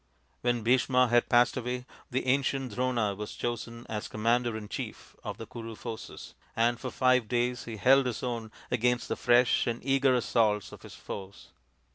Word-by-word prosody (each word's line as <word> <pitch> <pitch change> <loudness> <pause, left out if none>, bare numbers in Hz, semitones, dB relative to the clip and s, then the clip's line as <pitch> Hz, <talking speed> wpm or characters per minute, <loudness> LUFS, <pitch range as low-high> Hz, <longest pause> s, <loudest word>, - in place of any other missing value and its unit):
When 120 -2 0
Bhisma 125 +1 +3
had 120 0 +3
passed 120 0 +4
away 125 0 -3 0.2
the 130 0 -1
ancient 135 -2 0
Drona 120 -4 0
was 105 +1 -7
chosen 120 0 -4
as 105 -1 -4
commander 115 +1 +1
in 105 -1 -7
chief - - -7
of - - -5
the - - -7
Kuru 115 -1 -8
forces, 115 0 -8 0.2
and 120 +1 +2
for 130 - -4
five 130 -2 +2
days 120 +1 0
he 115 -2 -6
held 130 +4 +5
his 120 - -4
own 115 -3 -3 0.2
against 125 0 +1
the - - 0
fresh 125 0 +3
and 120 0 -1
eager 135 -1 +3
assaults 110 -4 +1
of - - -12
his - - -11
foes. 100 0 -9
120 Hz, 175 wpm, -29 LUFS, 115-125 Hz, 0.2 s, held